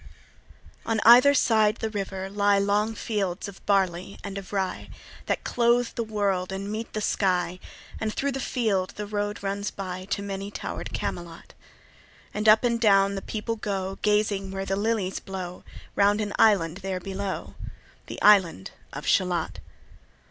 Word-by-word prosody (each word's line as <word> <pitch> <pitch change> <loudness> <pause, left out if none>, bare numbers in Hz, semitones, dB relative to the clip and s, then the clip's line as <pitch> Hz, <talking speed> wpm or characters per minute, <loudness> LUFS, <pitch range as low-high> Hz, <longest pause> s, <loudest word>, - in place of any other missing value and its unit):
On 225 -1 0
either 250 +5 +8
side 220 -4 +3
the 220 - -3
river 195 -2 -4
lie 200 0 +2
Long 205 +2 +1
fields 200 -4 -2
of 200 -1 -11
barley 190 -2 +1
and 200 -1 -6
of 195 -2 -7
rye, 190 -2 -2 0.4
That - - -1
clothe 240 0 +2
the 235 - -3
wold 200 -4 -1
and 195 +1 -4
meet 220 +1 -5
the 215 - -2
sky; 180 -3 0 0.4
And 220 -1 -1
thro' 280 +5 -1
the 270 - -4
field 210 -8 0
the 210 - -4
road 205 0 -3
runs 200 +1 -2
by 185 -1 -6
To 200 0 -2
many 200 0 -4
tower'd - - -6
Camelot; 170 -1 -5 0.8
And 210 +1 +2
up 215 +3 +6
and 235 -1 +1
down 200 -2 +5
the 195 - -4
people 225 +2 -4
go, 195 -2 -3
Gazing 210 -2 +1
where 195 0 -4
the 195 - -1
lilies 205 -2 -1
blow 185 -2 -7 0.3
Round 205 +1 +4
an 205 -1 -2
island 185 -6 +4
there 190 -1 -3
below, 190 +1 -5 0.5
The - - -7
island 185 - +5 0.2
of - - -6
Shalott. - - +1
200 Hz, 160 wpm, -26 LUFS, 190-215 Hz, 0.8 s, either